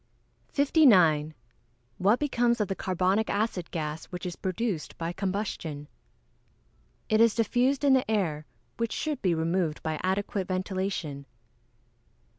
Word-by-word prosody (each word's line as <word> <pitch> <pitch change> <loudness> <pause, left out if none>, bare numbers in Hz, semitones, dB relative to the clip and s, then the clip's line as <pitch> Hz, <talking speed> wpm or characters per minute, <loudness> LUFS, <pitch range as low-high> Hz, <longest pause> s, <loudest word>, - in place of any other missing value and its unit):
_ - - -37
59. 185 - +4 0.6
What 205 +5 +4
becomes 240 -4 +1
of 210 - +1
the 195 - -1
carbonic 185 +4 0
acid 200 -4 -1
gas 155 -1 -4
which 180 0 -7
is 175 -1 -4
produced 190 -3 -3
by 165 +1 -3
combustion? 185 -6 -3 1.2
It 220 +1 +3
is 230 -2 +5
diffused 245 +5 +1
in 280 -2 +5
the 260 -4 +2
air, 165 -9 -1 0.3
which 230 -1 -1
should 300 -4 -3
be 180 -3 +2
removed 165 0 -1
by 155 -1 -2
adequate 190 0 -1
ventilation. 185 -6 -3
190 Hz, 130 wpm, -28 LUFS, 165-230 Hz, 1.2 s, is